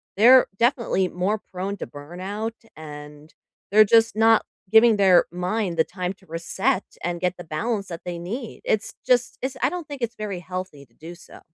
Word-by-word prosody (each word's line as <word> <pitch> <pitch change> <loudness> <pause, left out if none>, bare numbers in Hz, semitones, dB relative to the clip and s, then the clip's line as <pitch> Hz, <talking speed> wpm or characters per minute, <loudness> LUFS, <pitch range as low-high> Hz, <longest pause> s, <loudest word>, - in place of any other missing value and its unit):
they're 250 +5 +7
definitely 235 -6 +2
more 185 +5 -1
prone 195 +2 -4
to - - -6
burnout, 185 +9 -6 0.2
and 150 0 -11 0.4
they're 215 +1 +8
just 225 0 +4
not 225 0 +4 0.3
giving 225 0 +6
their 190 -3 +5
mind 180 +1 -2
the 160 - +5
time 180 +1 -4
to 190 0 -25
reset 190 +8 -1 0.2
and 175 0 -2
get 180 0 -1
the 175 - -8
balance 200 +6 -3
that 170 -2 -7
they 175 -1 -5
need, 220 +7 -6
it's 215 0 0
just 245 -2 +2
it's 260 +1 -3
I - - +4
don't 355 -3 -6
think 285 -3 -8
it's 235 0 -2
very 205 -5 -5
healthy 180 -5 -7
to 115 - -35
do 165 +7 -11
so. 175 - -15
190 Hz, 185 wpm, -23 LUFS, 175-225 Hz, 0.4 s, they're